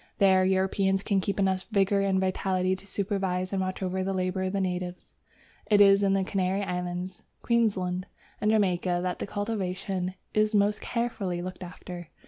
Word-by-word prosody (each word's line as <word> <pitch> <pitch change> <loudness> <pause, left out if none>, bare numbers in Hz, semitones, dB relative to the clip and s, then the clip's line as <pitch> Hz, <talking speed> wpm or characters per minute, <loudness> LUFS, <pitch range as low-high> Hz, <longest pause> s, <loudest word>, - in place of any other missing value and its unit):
There 190 -2 +5
Europeans 190 +1 +1
can 200 -3 +1
keep 200 +2 -2
enough 190 -1 +1
vigour 200 -2 +2
and 195 -1 +2
vitality 185 0 0
to 195 +1 -14
supervise 190 -2 -2
and 195 - 0
watch 185 +1 -3
over 185 0 -1
the 195 0 -1
labour 185 0 -1
of 185 +1 -1
natives. 180 -2 -3 0.6
It 205 -1 +4
is 200 0 +7
in 195 -1 +3
the 195 -1 +2
Canary 190 0 0
Islands, 180 0 -4 0.2
Queensland, 195 -6 +1 0.3
and 210 - +2
Jamaica 180 -4 +2
that 180 -1 -2
the - - -3
cultivation 190 -3 -3 0.2
is 215 0 +2
most 205 +1 +2
carefully 220 -7 -2
looked 185 0 -7
after. 175 -1 -8
190 Hz, 165 wpm, -28 LUFS, 185-200 Hz, 0.6 s, is